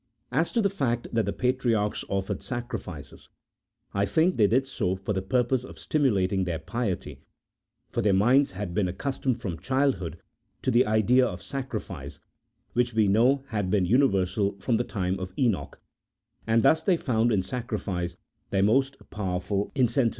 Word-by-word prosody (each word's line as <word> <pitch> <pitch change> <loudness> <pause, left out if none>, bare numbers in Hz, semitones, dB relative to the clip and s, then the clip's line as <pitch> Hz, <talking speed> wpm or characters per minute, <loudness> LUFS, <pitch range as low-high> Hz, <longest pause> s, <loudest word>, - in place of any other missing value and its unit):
As 165 - +1
to 230 - +2
the 200 - +3
fact 120 -10 -1
that 115 -3 +1
the - - +1
patriarchs 120 -5 0
offered 95 -1 -2
sacrifices, 90 - -6 0.6
I 100 +1 +1
think 170 +3 +2
they 105 -3 +4
did 130 +6 +2
so 95 -8 -1
for 95 +2 -3
the 95 - -1
purpose 125 +4 +1
of - - -11
stimulating 100 -10 +1
their 85 -2 -2
piety, 95 +4 -4 0.7
for - - 0
their 105 - +3
minds 120 +7 +4
had 95 -2 -5
been 100 -1 +1
accustomed 130 +5 -2
from 95 -9 -4
childhood 130 - 0 0.5
to 130 - +1
the 120 -1 +4
idea 110 +4 +4
of 90 -2 -6
sacrifice, 110 - -6 0.5
which 120 0 +1
we 110 -2 +4
know 125 +7 +3
had 105 -5 -1
been 100 -2 +2
universal 100 -3 +2
from 115 +3 0
the 120 - 0
time 95 -4 -2
of 95 0 -6
Enoch; 120 -8 0 0.7
and 115 0 +3
thus 160 0 +5
they 180 0 +2
found 120 -5 +1
in 100 -4 +2
sacrifice 100 -8 -3 0.3
their 95 -1 +2
most 135 +6 +2
powerful 95 0 -2
incentive. 125 -2 +3
110 Hz, 165 wpm, -27 LUFS, 95-130 Hz, 0.7 s, thus